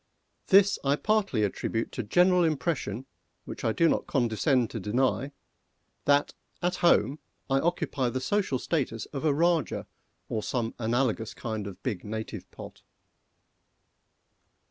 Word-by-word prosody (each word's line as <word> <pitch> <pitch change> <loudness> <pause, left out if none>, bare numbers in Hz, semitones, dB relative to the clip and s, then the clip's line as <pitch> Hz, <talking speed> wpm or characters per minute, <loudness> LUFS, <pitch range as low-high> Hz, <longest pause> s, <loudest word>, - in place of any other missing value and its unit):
This 200 +1 +5
I 140 0 +3
partly 200 - +1
attribute 115 +3 -2
to - - -3
general 180 - +4
impression 135 - -1 0.4
which - - -8
I 115 - +2
do 165 +9 +3
not - - 0
condescend 125 -1 +1
to 115 - -4
deny 125 +6 0 0.7
that, 145 0 +3 0.3
at 180 0 -1
home, 155 -3 +3 0.3
I 135 - +4
occupy 145 -6 0
the 130 - -2
social 190 -1 0
status 125 -6 -2
of 135 - -4
a 155 - +4
Rajah, 165 +2 +1 0.4
or 110 - -2
some 115 +1 -2
analogous 115 -1 0
kind 110 -3 -4
of 95 - -10
big 105 -9 -3
native 110 +1 -6
pot. - - -11
130 Hz, 135 wpm, -28 LUFS, 115-165 Hz, 0.7 s, This